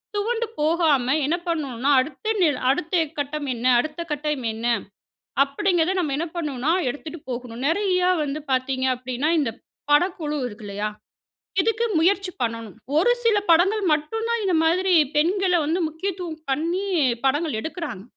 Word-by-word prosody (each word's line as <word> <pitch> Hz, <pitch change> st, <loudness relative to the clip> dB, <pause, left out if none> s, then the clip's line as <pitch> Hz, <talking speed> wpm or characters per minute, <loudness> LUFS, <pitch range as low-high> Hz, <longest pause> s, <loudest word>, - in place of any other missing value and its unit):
துவண்டு 455 Hz, +3 st, 0 dB, 0.2 s
போகாம, 310 Hz, -4 st, +3 dB, 0.2 s
என்ன 310 Hz, +5 st, +1 dB
பண்ணுனா, 280 Hz, -6 st, -1 dB
அடுத்து 305 Hz, +11 st, -3 dB
நில் 300 Hz, -7 st, +3 dB
அடுத்து 320 Hz, +6 st, +1 dB, 0.2 s
கட்டம் 290 Hz, 0 st, -3 dB
என்ன? 235 Hz, 0 st, -6 dB
அடுத்த 305 Hz, +5 st, -3 dB
கட்டம் 295 Hz, -3 st, -2 dB
என்ன? 225 Hz, +1 st, -6 dB, 0.8 s
அப்பிடிங்கிறத 350 Hz, +4 st, +1 dB
நம்ம 305 Hz, -6 st, -1 dB
என்ன 335 Hz, +3 st, -2 dB
பண்ணணுனா, 295 Hz, -3 st, -1 dB, 0.2 s
எடுத்துட்டு 310 Hz, +5 st, -7 dB
போகணும். 245 Hz, -1 st, -5 dB
நிறையா 365 Hz, +1 st, +2 dB
வந்து 295 Hz, +1 st, -3 dB
பார்த்தீங்க 260 Hz, 0 st, 0 dB
அப்பிடின்னா, 255 Hz, +4 st, -2 dB
இந்த 275 Hz, -6 st, 0 dB, 0.4 s
படக்குழு 300 Hz, -1 st, +2 dB
இருக்கு 210 Hz, -2 st, -10 dB
இல்லயா! 205 Hz, +1 st, -3 dB, 0.7 s
இதுக்கு 455 Hz, +4 st, +1 dB
முயற்சி 380 Hz, +3 st, +2 dB
பண்ணணும். 230 Hz, -3 st, -3 dB, 0.2 s
ஒரு 475 Hz, +9 st, +4 dB
சில 455 Hz, -2 st, +4 dB
படங்கள் 385 Hz, +6 st, +4 dB
மட்டும் 305 Hz, +10 st, -1 dB
தான், 470 Hz, -1 st, 0 dB
இந்த 375 Hz, -2 st, +1 dB
மாதிரி 365 Hz, +3 st, +3 dB, 0.2 s
பெண்கள 365 Hz, +5 st, +2 dB
வந்து 325 Hz, +5 st, 0 dB
முக்கியத்துவம் 340 Hz, 0 st, -5 dB
பண்ணி, 335 Hz, +8 st, -1 dB, 0.4 s
படங்கள் 290 Hz, -2 st, +1 dB
எடுக்கிறாங்க. 320 Hz, -, -5 dB
310 Hz, 140 wpm, -23 LUFS, 270-360 Hz, 0.8 s, ஒரு